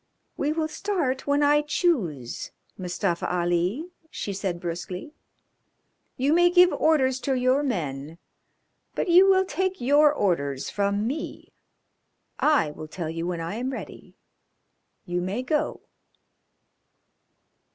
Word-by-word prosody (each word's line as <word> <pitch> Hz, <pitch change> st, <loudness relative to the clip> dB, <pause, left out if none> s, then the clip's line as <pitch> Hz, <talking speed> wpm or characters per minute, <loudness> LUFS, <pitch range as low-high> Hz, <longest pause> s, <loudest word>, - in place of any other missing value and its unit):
"We 290 Hz, -, 0 dB
will 315 Hz, 0 st, -1 dB
start 315 Hz, -8 st, -2 dB
when 285 Hz, +1 st, +2 dB
I 295 Hz, +1 st, +4 dB
choose, 220 Hz, -, -1 dB, 0.3 s
Mustafa 180 Hz, -1 st, -2 dB
Ali," 180 Hz, -, 0 dB, 0.2 s
she 200 Hz, -, -5 dB
said 190 Hz, -3 st, -3 dB
brusquely. 180 Hz, -, -5 dB, 1.0 s
"You 275 Hz, +4 st, +2 dB
may 350 Hz, +1 st, +5 dB
give 360 Hz, 0 st, +6 dB
orders 265 Hz, -5 st, +2 dB
to 270 Hz, +1 st, -1 dB
your 255 Hz, +2 st, +2 dB
men, 160 Hz, -, -3 dB, 0.8 s
but -, -, -1 dB
you 370 Hz, +3 st, +7 dB
will 380 Hz, 0 st, +4 dB
take 375 Hz, 0 st, -2 dB
your 290 Hz, +4 st, +5 dB
orders 140 Hz, -, -1 dB
from 200 Hz, +1 st, 0 dB
me. 285 Hz, +7 st, -5 dB, 0.9 s
I 290 Hz, -, +3 dB
will 155 Hz, +1 st, -9 dB
tell 160 Hz, 0 st, -5 dB
you 165 Hz, +1 st, -4 dB
when 175 Hz, -2 st, -3 dB
I 170 Hz, +6 st, -4 dB
am 250 Hz, +2 st, -2 dB
ready. -, -, -9 dB, 0.9 s
You 175 Hz, 0 st, -2 dB
may 195 Hz, +8 st, -2 dB
go." 300 Hz, +3 st, -1 dB
250 Hz, 125 wpm, -25 LUFS, -, 1.0 s, you